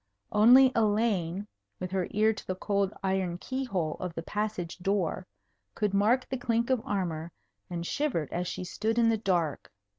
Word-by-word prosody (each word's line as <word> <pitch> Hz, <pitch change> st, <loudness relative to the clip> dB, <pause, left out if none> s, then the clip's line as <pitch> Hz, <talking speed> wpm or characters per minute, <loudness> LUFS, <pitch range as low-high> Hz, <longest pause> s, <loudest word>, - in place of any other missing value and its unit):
Only 250 Hz, +5 st, +7 dB
Elaine, 205 Hz, -4 st, +1 dB, 0.3 s
with 185 Hz, 0 st, -4 dB
her 190 Hz, -2 st, 0 dB
ear 215 Hz, +2 st, +3 dB
to -, -, -10 dB
the 185 Hz, -, -1 dB
cold 200 Hz, 0 st, 0 dB
iron 190 Hz, -2 st, 0 dB
key 260 Hz, +8 st, -3 dB
hole 175 Hz, -9 st, -2 dB
of 180 Hz, -2 st, -5 dB
the 165 Hz, -, -4 dB
passage 205 Hz, -4 st, -3 dB
door, 185 Hz, -1 st, -1 dB, 0.5 s
could 210 Hz, -2 st, 0 dB
mark 225 Hz, +6 st, +3 dB
the 265 Hz, -, -3 dB
clink 235 Hz, 0 st, 0 dB
of 255 Hz, -3 st, +2 dB
armour, 170 Hz, -5 st, -2 dB, 0.4 s
and 170 Hz, -1 st, -4 dB
shivered 175 Hz, -, -1 dB
as 175 Hz, +1 st, -1 dB
she 180 Hz, -, -4 dB
stood 220 Hz, +5 st, -2 dB
in 230 Hz, -1 st, +5 dB
the 225 Hz, -, +2 dB
dark. 175 Hz, -8 st, -1 dB
200 Hz, 175 wpm, -29 LUFS, 180-225 Hz, 0.5 s, Only